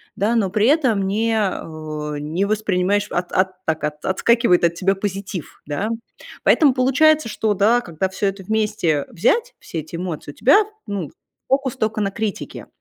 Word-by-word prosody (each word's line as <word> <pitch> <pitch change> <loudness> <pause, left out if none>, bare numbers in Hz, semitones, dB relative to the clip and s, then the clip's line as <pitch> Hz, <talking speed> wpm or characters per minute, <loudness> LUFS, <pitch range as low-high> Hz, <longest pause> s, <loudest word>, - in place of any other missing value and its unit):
да, 210 +4 +1
но 210 -5 +2
при 210 +2 +1
этом 255 -9 +3
не, 225 +3 0
э, 155 -6 -3
не 160 +7 -1
воспринимаешь, 205 -1 +1
от 175 0 -2
от 185 0 0
так, 160 -1 -1 0.2
отскакивает 210 -1 +3
от 170 0 +3
тебя 195 +3 +1
позитив, 195 -3 -5
да. 150 +9 -2 0.5
Поэтому 290 -5 +5
получается, 270 +2 +3
что, 215 0 0
да, 220 +5 +3
когда 175 -2 -3
всё 190 +2 -1
это 195 0 -3
вместе 210 -8 0
взять, 465 - +1
все 165 - -6
эти 160 +2 -10
эмоции, 170 -4 -5
у - - -18
тебя, 285 - +5 0.2
ну, 195 -7 -4 0.4
фокус 270 -1 0
только 220 0 -1
на 200 - +1
критике. 210 0 -5
200 Hz, 165 wpm, -21 LUFS, 175-225 Hz, 0.5 s, Поэтому